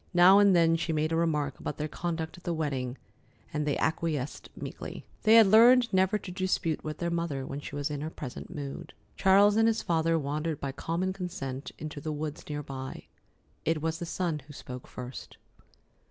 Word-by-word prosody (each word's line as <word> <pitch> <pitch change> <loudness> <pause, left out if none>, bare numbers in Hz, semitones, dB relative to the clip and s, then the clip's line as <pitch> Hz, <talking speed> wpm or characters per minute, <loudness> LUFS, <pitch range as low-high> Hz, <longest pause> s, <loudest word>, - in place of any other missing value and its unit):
Now 185 +3 +8
and 200 -2 +6
then 165 -1 +4
she 165 - -2
made 155 0 0
a - - +1
remark 150 -4 0
about - - -4
their 150 - -2
conduct 165 0 -4
at 175 - -15
the 170 -2 -1
wedding, 135 -5 -2 0.6
and 150 0 -1
they 145 - +1
acquiesced 155 -3 -2
meekly. - - -7 0.2
They 220 +1 +6
had 225 -1 +9
learned 235 +3 +6
never 190 +2 +3
to 195 - -8
dispute 180 -4 -1
with 155 0 -4
their 170 -1 -2
mother 170 -6 -2
when 140 - -5
she 145 - -8
was 145 +1 -2
in 145 -1 -3
her 155 - -3
present 140 -5 -8
mood. 140 -2 -7 0.2
Charles 200 +2 +5
and 225 0 +5
his 225 0 +1
father 165 -1 +2
wandered 150 +1 -2
by 140 - -3
common 170 +7 -2
consent 155 -8 -5
into 150 -1 -6
the 155 - -3
woods 150 0 -5
near 150 0 -3
by. 130 -1 -7 0.6
It 160 -1 +1
was 160 0 -1
the 170 - -4
son 170 -3 -1
who 145 - -11
spoke 125 -2 -8
first. 125 +1 -8
160 Hz, 200 wpm, -29 LUFS, 145-180 Hz, 0.6 s, had